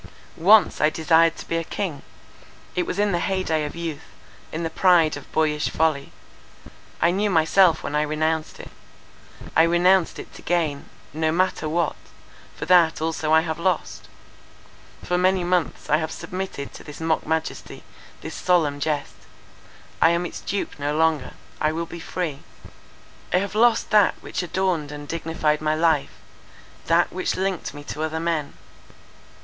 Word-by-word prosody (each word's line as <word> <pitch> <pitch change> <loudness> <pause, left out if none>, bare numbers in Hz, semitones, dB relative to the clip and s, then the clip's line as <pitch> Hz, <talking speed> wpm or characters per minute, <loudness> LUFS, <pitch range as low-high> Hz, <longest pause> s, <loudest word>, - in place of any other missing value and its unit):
"Once 200 +5 +5
I 150 - +5
desired 165 +1 +3
to - - -9
be 165 - -1
a 165 - -1
king. 165 -4 -4 0.7
It 180 - 0
was - - -3
in 205 0 +2
the 175 - 0
hey 190 +1 -1
day 155 -3 0
of 150 - -7
youth, 165 -3 -5 0.5
in 165 +2 -4
the 165 - -2
pride 170 -3 +4
of 145 - -11
boyish 150 -1 +1
folly. 155 -3 0 0.9
I 170 - +3
knew 205 +3 0
myself 165 0 +4
when - - -4
I 150 - +3
renounced 155 +1 -1
it. - - -10 0.8
I 160 - +6
renounced 175 +2 +3
it - - -10
to - - -12
gain 160 -5 -1 0.2
—no 160 +1 0
matter 175 -2 0
what—for 165 -1 -5
that 175 -2 +4
also 160 -1 -2
I 160 0 +6
have 160 -1 -4
lost. 180 -1 -2 1.0
For 180 0 0
many 185 0 +2
months 175 -2 -1
I 150 - +3
have 160 0 -3
submitted 185 -7 -6
to - - -11
this 150 - -10
mock 160 -1 -1
majesty—this 160 0 -6
solemn 160 -6 +1
jest. 150 0 -2 0.9
I - - +7
am 170 +1 0
its - - -7
dupe 200 -6 -4
no 145 +1 -1
longer. 160 -4 +1 0.3
I 155 - +2
will 165 +1 -3
be 170 - -9
free. 165 -4 -4 0.9
"I - - +3
have 200 +2 -2
lost 230 +2 +3
that 210 -2 +5
which - - -4
adorned 175 -4 -1
and 145 0 -8
dignified 160 -2 -1
my 155 0 +1
life; 160 -3 +1 0.7
that - - +3
which - - -1
linked 190 -4 -2
me 145 - -9
to 150 - -6
other 160 0 -2
men. 165 -3 -2
160 Hz, 165 wpm, -23 LUFS, 155-180 Hz, 1.0 s, I